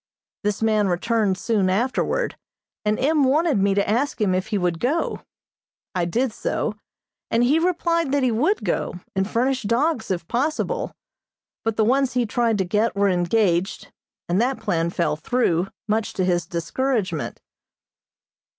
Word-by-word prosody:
This 210 +1 -1
man 215 -2 +3
returned 195 +2 +1
soon 200 -2 +1
afterward, 260 - 0 0.5
and 210 0 +1
M. 295 +2 +3
wanted 290 -1 +3
me 195 0 +2
to 200 - +1
ask 245 +5 0
him 200 -4 +2
if 185 +2 -1
he 215 -2 -1
would 175 -3 0
go. 295 - -1 0.7
I 180 -3 0
did 230 +7 0
so, - - -2 0.6
and 230 +1 +2
he 285 +6 +4
replied 335 -3 +1
that 285 -1 +2
he 255 - +3
would 310 - +1
go, - - -1 0.2
and 190 +1 0
furnish 255 +3 +1
dogs 235 +4 0
if 175 -3 -2
possible; 280 +6 -1 0.7
but 225 -1 -1
the 220 - +3
ones 265 +2 +2
he 245 -1 +1
tried 230 -1 +1
to 190 - 0
get 210 +5 +1
were 200 0 +3
engaged, 180 0 +1 0.4
and 180 +5 +2
that 255 +2 0
plan 165 0 0
fell 170 -3 0
through, 180 -2 +1 0.2
much 220 +1 0
to 185 - 0
his 175 -1 0
discouragement. 215 +5 -2
220 Hz, 160 wpm, -23 LUFS, 190-260 Hz, 0.7 s, he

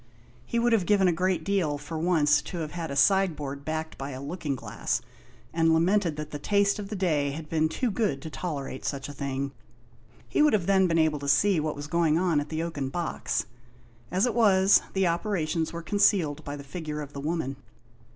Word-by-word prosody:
He 235 - -1
would 235 0 +3
have 195 -6 +2
given 200 -3 +4
a - - +4
great 180 -1 0
deal, 180 -7 +1
for 160 +3 -8
once, 155 -2 +3
to 180 - -7
have 155 -2 -4
had 170 -2 -4
a 140 - -4
sideboard 150 -4 +2
backed 160 +1 -4
by 135 +1 -4
a 130 -2 -6
looking 145 0 -3
glass, - - -2 0.5
and 165 0 +3
lamented 175 0 +2
that 150 0 -6
the 145 - -5
taste 200 +5 +2
of 200 -1 -6
the 215 - -4
day 155 -7 +1
had 155 +1 -7
been 160 -1 +1
too 235 +8 -1
good 195 - 0
to 160 - -7
tolerate 140 -7 -5
such 135 -2 -3
a - - -7
thing. 140 0 -3 0.8
He - - +1
would 300 -4 +5
have 200 -5 +2
then 190 -1 +4
been 165 -1 +1
able 160 -2 +2
to 140 - -6
see 165 +6 +4
what 155 0 -2
was 145 0 -6
going 160 0 +2
on 170 -4 +2
at 145 0 -4
the 160 +1 -2
oaken 145 -5 -3
box. 170 +3 -2 0.6
As 185 +5 +2
it 245 - 0
was, 200 -4 +5
the 190 -1 +2
operations 170 -3 0
were 170 0 -6
concealed 190 -6 +2
by 145 - -5
the 140 - -8
figure 150 +1 -5
of 145 -1 -8
the 140 - -6
woman. 150 -3 -2
165 Hz, 215 wpm, -27 LUFS, 145-190 Hz, 0.8 s, would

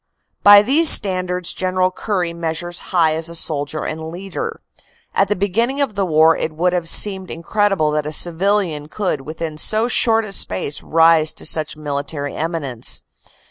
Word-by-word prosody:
By 205 0 +8
these 295 +8 +4
standards 180 -2 +2
General 185 0 0
Currie 185 -3 -3
measures 170 +1 -4
high 165 -4 +2
as 165 +1 -1
soldier 150 0 -3
and 160 +1 -5
leader. 195 - -6 0.5
At 195 - +2
the 210 - -1
beginning 230 +8 -1
of 280 -6 0
the 195 -2 -2
war 160 0 +4
it 155 - -3
would 175 +3 0
have 175 -2 -1
seemed 190 0 +2
incredible 185 -1 0
that 150 0 -2
a - - -4
civilian 175 -2 0
could 180 -5 -3
within 155 +1 -7
so 220 +6 +2
short 225 -2 +1
a 205 - -8
space 140 - -1
rise 160 -1 +3
to - - -4
such 155 -1 +2
military 145 -1 -5
eminence. 150 -7 -3
170 Hz, 160 wpm, -18 LUFS, 155-195 Hz, 0.5 s, By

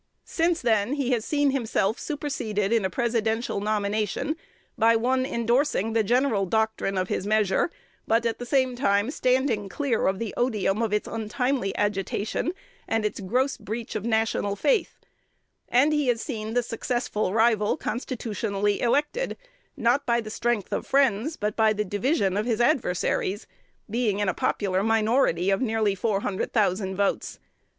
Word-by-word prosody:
Since 335 0 0
then 220 +1 +2
he 275 -3 -1
has 235 -3 +1
seen 290 -2 +2
himself 225 -5 0
superseded 230 -8 -2
in 230 -3 +2
a 190 - 0
Presidential 225 +1 -1
nomination 210 +6 -1 0.4
by 230 +1 +4
one 255 +3 +1
indorsing 235 -2 +1
the 225 -1 +3
general 235 -3 +2
doctrine 220 -1 0
of 185 0 0
his 195 - -2
measure, 215 - +2 0.4
but 230 +1 +2
at 230 - -1
the 245 - -5
same 260 -1 +2
time 215 -2 +1
standing 255 -7 +1
clear 265 -1 0
of 190 0 +1
the 225 0 -4
odium 215 -4 0
of 225 -3 0
its 210 0 0
untimely 225 0 -2
agitation 205 - -1 0.4
and 225 -1 0
its 210 - -2
gross' 250 +8 0
breach 220 +1 -5
of 215 - -3
national 220 -3 0
faith; 445 - 0 0.7
and 275 +5 +4
he 295 -3 +1
has 240 -2 +2
seen 225 -3 -4
the 245 - +3
successful 230 -3 -2
rival 220 -1 +2
constitutionally 210 -4 -2
elected, 295 - 0 0.4
not 245 +5 +1
by 235 0 +3
the 215 -2 -6
strength 235 -4 -1
of - - -2
friends, 270 +1 +2
but 210 0 -2
by 220 -1 +4
the 210 0 -2
division 205 - 0
of 215 +3 -1
his 230 -2 0
adversaries, 220 - 0 0.4
being 220 -2 0
in 205 -1 0
a 185 - +1
popular 190 +1 0
minority 220 -4 +2
of 195 - +1
nearly 220 -4 +1
four 200 0 -1
hundred 195 -2 -2
thousand 190 -3 +1
votes. 200 +1 -1
225 Hz, 160 wpm, -26 LUFS, 205-250 Hz, 0.7 s, by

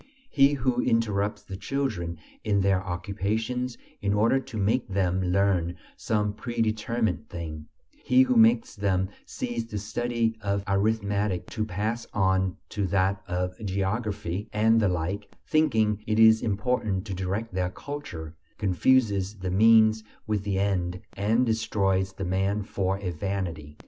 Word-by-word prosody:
He 140 0 +5
who 130 -2 +1
interrupts 105 -3 0
the 95 - -7
children 100 - -2 0.3
in 100 -2 +2
their 95 -1 +2
occupations 110 +7 -2 0.2
in 100 0 +1
order 115 +6 +3
to 120 -4 -8
make 110 +5 +1
them 95 -1 0
learn 90 -2 +1 0.2
some 105 -2 -1
pre 120 +2 -6
determined 110 +1 0
thing; 80 -3 -6 0.4
he 130 +1 +5
who 130 -1 +1
makes 115 +1 +4
them 95 -2 0 0.2
cease 120 -1 -3
the 115 -2 -6
study 115 +2 -1
of 100 0 -1
arithmetic 100 -1 0
to 110 -2 -1
pass 110 +3 -3
on 95 -2 +2
to 100 -2 -1
that 95 +1 +1
of 90 +3 -3
geography 100 0 -2
and 110 +2 +4
the 105 -3 +3
like, 90 +4 -2 0.2
thinking 110 -9 +2
it 110 0 +1
is 110 0 +7
important 105 -2 -1
to 100 - -4
direct 95 +4 -3
their 90 -1 0
culture, 90 - -7 0.2
confuses 100 0 +2
the 95 -1 -3
means 110 +2 +5 0.2
with 105 -2 0
the 100 -2 -1
end 90 -3 0
and 110 +5 +2
destroys 95 -4 0
the 95 - -5
man 95 +3 0
for 95 -1 -1
a 95 -2 -3
vanity. 85 -4 -4
100 Hz, 145 wpm, -27 LUFS, 95-110 Hz, 0.4 s, is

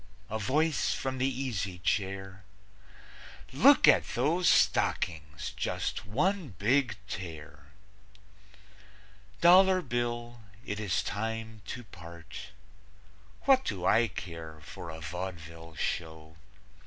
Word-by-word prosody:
A 110 - -2
voice 150 +8 +1
from 130 -1 -3
the 130 +1 +2
easy 115 -8 -3
chair: 95 +1 -2 1.1
"Look - - +6
at - - +4
those 165 +9 +2
stockings! 80 -2 +1
Just - - -3
one 150 - 0
big 115 +3 +2
tear!") 85 -5 -8 1.8
Dollar 185 +1 +6
Bill, 120 -1 -3 0.2
it 100 - -4
is 100 -4 0
time 110 0 -4
to 125 - -6
part. 85 -5 -10 1.0
What 265 -1 +5
do 95 -4 -3
I 115 +4 +4
care 80 -6 -8
for 85 +3 -9
a 80 0 -7
vaudeville 85 -2 -7
show? 80 0 -4
100 Hz, 105 wpm, -30 LUFS, 85-125 Hz, 1.8 s, Look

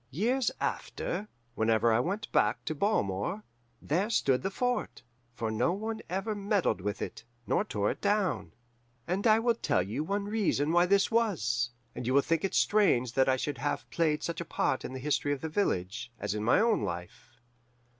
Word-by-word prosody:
Years 230 - +1
after, 200 +4 -3 0.3
whenever 110 0 +3
I 110 - +3
went 200 - -2
back - - +2
to 155 - -1
Balmore, 170 - 0 0.4
there 185 +8 0
stood 135 - +2
the 195 - -1
fort, 245 +5 -2 0.3
for 110 -2 -2
no 110 +10 +1
one 220 +3 -4
ever 195 +4 -2
meddled 200 - 0
with 105 +2 -3
it, - - -7 0.2
nor - - +1
tore 105 -1 -1
it - - -8
down. 205 -2 0 0.6
"And 195 +6 0
I 215 0 +6
will 235 +1 +2
tell 95 - +1
you 110 +11 -3
one 200 +4 -2
reason 200 -8 +1
why 175 +1 +4
this 200 +3 +3
was, 130 - +1 0.2
and 120 - -5
you 130 - +2
will 140 - +5
think 165 -1 0
it 195 - -1
strange 155 - +3
that 130 0 +3
it 130 0 +3
should 145 - -3
have 145 - -2
played 155 -2 +1
such 170 0 -3
a - - -5
part 130 - 0
in 130 - -6
the - - -4
history 145 +1 0
of 140 - -5
the 160 - -3
village, 115 - -1
as 100 -1 -2
in 105 0 -3
my 115 - +4
own 230 - +3
life. 85 - -6
160 Hz, 195 wpm, -30 LUFS, -, 0.6 s, I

